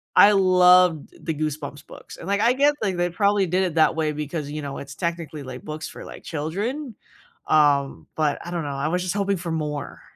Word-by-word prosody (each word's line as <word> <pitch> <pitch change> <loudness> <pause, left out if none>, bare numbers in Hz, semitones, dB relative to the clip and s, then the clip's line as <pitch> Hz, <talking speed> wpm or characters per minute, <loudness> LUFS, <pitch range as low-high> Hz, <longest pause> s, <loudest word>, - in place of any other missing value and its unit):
I 205 - +8
loved 180 -4 +5
the 160 - -1
Goosebumps 150 -1 -4
books, - - -12
and, 165 - -9
like, 200 +1 +1
I 235 +2 +4
guess, 285 +2 +3
like, 190 -4 -1
they 175 0 +1
probably 200 +1 +2
did 185 +3 +1
it 175 -3 -2
that 160 0 +4
way 155 -1 0
because, 150 0 -4
you 150 0 -4
know, 140 -1 -5
it's 140 -1 -8
technically, 165 -4 -4
like, 130 -1 -8
books 155 +1 -6
for, - - -10
like, - - -11
children, 205 - -4 0.5
um, 145 -3 +2
but 155 -2 0
I 175 - -6
don't 170 -2 -2
know, 145 - -4
I 140 +3 -1
was 180 +1 0
just 185 +2 -2
hoping 200 -1 0
for 170 -1 -5
more. 150 -3 -4
165 Hz, 220 wpm, -23 LUFS, 150-190 Hz, 0.5 s, I